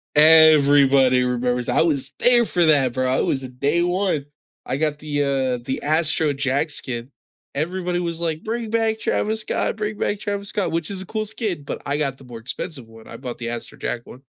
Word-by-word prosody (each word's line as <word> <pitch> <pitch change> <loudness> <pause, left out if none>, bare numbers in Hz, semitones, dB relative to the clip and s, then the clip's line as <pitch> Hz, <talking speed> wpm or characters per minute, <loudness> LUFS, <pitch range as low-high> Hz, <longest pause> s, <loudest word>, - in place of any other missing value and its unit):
Everybody 140 -4 +6
remembers. 125 0 -1
I - - +2
was 145 -4 0
there 240 -1 +6
for 175 -4 +1
that, 135 -6 +3
bro. 130 0 0
I - - +1
was 135 -2 -1
day 140 +7 -1
1. 175 -5 -1 0.4
I 130 - -2
got 150 -1 -1
the, 145 -1 -2
uh, 130 -3 -1
the 130 - -3
Astro 155 -1 +2
Jack 140 +3 -1
skin. 120 0 -1 0.4
Everybody 175 +3 -2
was 170 -1 -3
like, 160 -2 -3
"Bring 225 0 -4
back 225 -1 0
Travis 220 +1 0
Scott. 215 - -2
Bring 210 0 -4
back 205 - -2
Travis 200 -1 -2
Scott," 205 -4 -1
which 165 +3 -1
is 190 -1 0
a - - -6
cool 215 -1 -2
skin, 205 - 0
but - - -6
I 145 +1 -1
got 135 -3 -2
the - - -15
more 120 -2 -10
expensive 130 +1 -5
one. 115 0 -16
I 115 - -10
bought 125 -2 -7
the 115 0 -4
Astro 120 -1 -6
Jack 120 - -3
one. 130 - -13
150 Hz, 205 wpm, -21 LUFS, 130-180 Hz, 0.4 s, Everybody